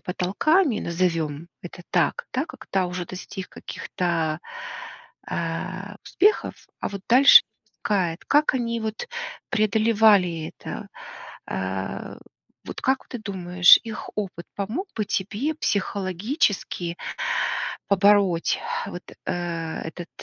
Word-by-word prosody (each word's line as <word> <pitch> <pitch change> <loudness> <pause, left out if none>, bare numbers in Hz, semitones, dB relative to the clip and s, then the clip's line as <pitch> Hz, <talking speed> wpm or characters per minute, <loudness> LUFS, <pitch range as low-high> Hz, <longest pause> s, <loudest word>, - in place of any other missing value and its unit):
потолками, 220 - +2
назовем 165 -3 -1
это 175 0 -9
так, 480 +1 +1
да, - - +1
когда 190 -1 -2
уже 180 -1 -4
достиг 185 +1 -7
каких-то, 165 -3 -2 0.9
а, 185 +5 -4
успехов, 415 +3 +2 0.3
а - - -1
вот 200 -1 -6
дальше 260 +4 +9 0.4
кает 180 -5 0
как 295 0 +4
они 235 -2 -1
вот 220 - -4 0.4
преодолевали 215 -6 +3
это. - - -7 0.6
А, 95 +1 -4 0.5
вот - - -7
как 265 0 +1
ты 245 - -5
думаешь, 180 -4 +5
их 225 -2 -6
опыт 190 -5 -4
помог 225 - -3
бы 215 - 0
тебе 215 +10 -1
психологически 195 - -1 0.9
побороть 200 -3 +4 0.3
вот, - - -6 0.2
э, - - -1 0.5
этот, 165 +1 -7
195 Hz, 105 wpm, -24 LUFS, 175-220 Hz, 0.9 s, дальше